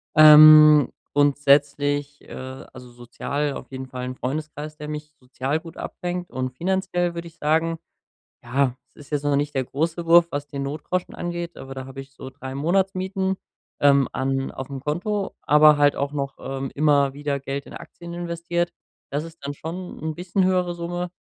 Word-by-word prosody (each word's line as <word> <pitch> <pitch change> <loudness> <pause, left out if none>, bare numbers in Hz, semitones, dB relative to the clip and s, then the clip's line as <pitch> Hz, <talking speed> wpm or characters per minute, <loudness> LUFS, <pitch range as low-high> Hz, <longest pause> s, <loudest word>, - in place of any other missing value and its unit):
Ähm, 155 -1 +9 0.2
grundsätzlich, 145 0 +2
äh, 130 0 -8
also 125 -1 -11
sozial 140 +4 -3
auf - - -9
jeden 130 0 -6
Fall 125 -1 -6
'n 130 - -5
Freundeskreis, 150 +3 -5
der 150 0 -7
mich 150 0 -7
sozial 130 +3 -3
gut 165 -1 -12
abfängt. 180 0 -5
Und 130 0 -2
finanziell 175 +2 -1
würde 170 0 -5
ich 165 - -26
sagen, 160 +2 +1 0.7
ja, 130 +1 0
es - - -40
ist 145 - -14
jetzt 145 -1 -1
noch 145 -1 +2
nicht 145 +1 -1
der 135 - +1
große 165 +6 -2
Wurf, 170 0 +7
was 145 0 -4
den 140 -1 -5
Notgroschen 155 +6 -3
angeht, 175 0 -5
aber 135 0 -9
da 130 0 -6
habe 135 +1 -8
ich 135 0 -15
so 130 - -8
3 130 0 -8
Monatsmieten, 190 +4 0 0.5
ähm, 140 -2 +5
an 135 0 -1
auf'm 135 +1 -6
Konto, 195 +8 -2
aber 150 0 +6
halt 145 0 +4
auch 140 0 -2
noch, 140 -1 -3
ähm, 135 0 -4
immer 140 -2 +3
wieder 145 0 -2
Geld 135 +1 -5
in - - -13
Aktien 170 0 -10
investiert. 175 0 -2 0.4
Das 145 +2 -1
ist 165 0 -11
dann 140 - -3
schon 170 +5 -7
'n 155 0 -3
bisschen 180 +2 -1
höhere 180 -1 +1
Summe, 175 +1 -4
150 Hz, 180 wpm, -23 LUFS, 140-170 Hz, 0.7 s, Ähm